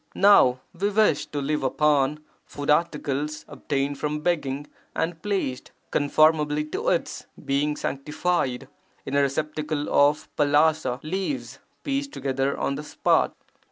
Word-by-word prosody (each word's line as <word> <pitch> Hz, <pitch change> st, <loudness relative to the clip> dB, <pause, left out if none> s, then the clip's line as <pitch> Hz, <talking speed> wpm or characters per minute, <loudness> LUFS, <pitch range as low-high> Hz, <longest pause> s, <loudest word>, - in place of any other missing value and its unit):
Now 130 Hz, -11 st, +5 dB
we 195 Hz, +4 st, -1 dB
wish 210 Hz, -7 st, +2 dB
to 145 Hz, -, -4 dB
live 150 Hz, +2 st, -1 dB
upon 150 Hz, +1 st, +2 dB, 0.2 s
food 145 Hz, 0 st, -3 dB
articles 150 Hz, -2 st, -1 dB
obtained 140 Hz, 0 st, -2 dB
from 150 Hz, 0 st, -2 dB
begging 145 Hz, -4 st, -1 dB, 0.3 s
and 165 Hz, 0 st, -2 dB
placed, 195 Hz, -11 st, -2 dB, 0.2 s
(conformably 150 Hz, 0 st, +3 dB
to -, -, 0 dB
its) -, -, -2 dB, 0.2 s
being 145 Hz, +2 st, +1 dB
sanctified, 140 Hz, -2 st, -2 dB, 0.4 s
in 135 Hz, -, -3 dB
a 140 Hz, -, +4 dB
receptacle 150 Hz, +1 st, -2 dB
of 145 Hz, +2 st, +3 dB
palasa 145 Hz, -3 st, +2 dB
leaves 190 Hz, -, -3 dB, 0.2 s
pieced 280 Hz, 0 st, -2 dB
together 135 Hz, 0 st, -1 dB
on -, -, -1 dB
the 145 Hz, +2 st, -5 dB
spot. -, -, +1 dB
150 Hz, 125 wpm, -25 LUFS, 140-160 Hz, 0.4 s, Now